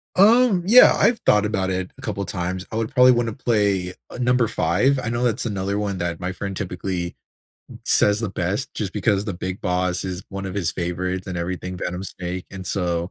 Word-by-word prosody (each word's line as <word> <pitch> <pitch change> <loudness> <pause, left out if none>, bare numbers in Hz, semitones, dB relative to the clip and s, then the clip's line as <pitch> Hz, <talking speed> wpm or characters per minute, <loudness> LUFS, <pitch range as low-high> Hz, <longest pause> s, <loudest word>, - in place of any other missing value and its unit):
Um, 215 -1 +5
yeah. 245 +5 +8
I've 235 - +3
thought 105 0 +4
about 95 -3 -1
it 95 0 -3
a - - -13
couple 105 -7 -3
times. 90 +1 -3
I - - -5
would 115 0 -2
probably 125 0 +7
wanna 120 -2 +1
play, 100 -7 0 0.2
uh, - - -8
number 125 -1 +2
5. 135 +4 +1
I 115 - -2
know 120 +1 -1
that's 120 -1 0
another 100 -2 -2
one 100 -2 -2
that 85 -1 -3
my 90 0 -3
friend 100 +1 -5
typically 90 -2 -4 0.7
says 105 +1 +3
the 115 -4 -2
best, 95 +8 -2
just 100 -4 -3
because 100 -1 +1
the 100 -4 -3
big 95 +2 -5
boss 90 0 0
is 95 0 -4
one 100 0 -5
of 95 - -5
his 90 -5 -1
favorites 90 +1 -3
and 95 -2 -4
everything, 90 +1 -4
Venom 90 +1 -4
Snake. 90 -1 -6
And 95 -1 -8
so, 85 -2 -1
95 Hz, 205 wpm, -22 LUFS, 90-115 Hz, 0.7 s, yeah